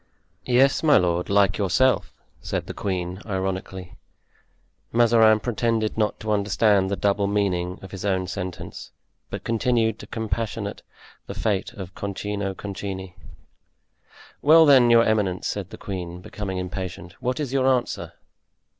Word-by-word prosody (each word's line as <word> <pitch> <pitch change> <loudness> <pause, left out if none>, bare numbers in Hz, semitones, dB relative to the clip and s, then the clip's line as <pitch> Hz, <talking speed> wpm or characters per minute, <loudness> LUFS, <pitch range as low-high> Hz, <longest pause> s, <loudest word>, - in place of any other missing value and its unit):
"Yes, 130 +2 +4
my 155 -2 +5
lord, 90 -1 0
like 100 0 +3
yourself!" 125 +7 +2 0.3
said - - -3
the - - -6
queen, 90 -1 -3
ironically. 95 -2 -4 0.9
Mazarin 115 -2 +5
pretended 115 -1 -1
not 105 -1 0
to 110 -1 -2
understand 100 -1 +2
the 100 - 0
double 100 0 +1
meaning 95 -3 0
of 95 - -10
his 95 - -7
own 95 -2 0
sentence, 90 0 -6 0.4
but - - -6
continued 115 -1 +1
to - - -10
compassionate 110 -2 -3 0.5
the - - -6
fate 105 +1 -1
of 95 -6 -8
Concino 100 0 -4
Concini. 95 -2 -6 1.3
"Well 160 +2 +7
then, 130 -5 +6
your 115 -1 +6
eminence," 105 -5 0
said 100 -3 -3
the - - -10
queen, 90 -3 -6
becoming 100 -1 -5
impatient, 90 -1 -5
"what 125 +1 -2
is 140 -4 -3
your 130 -1 +2
answer?" 125 -2 0
100 Hz, 135 wpm, -24 LUFS, 95-115 Hz, 1.3 s, Well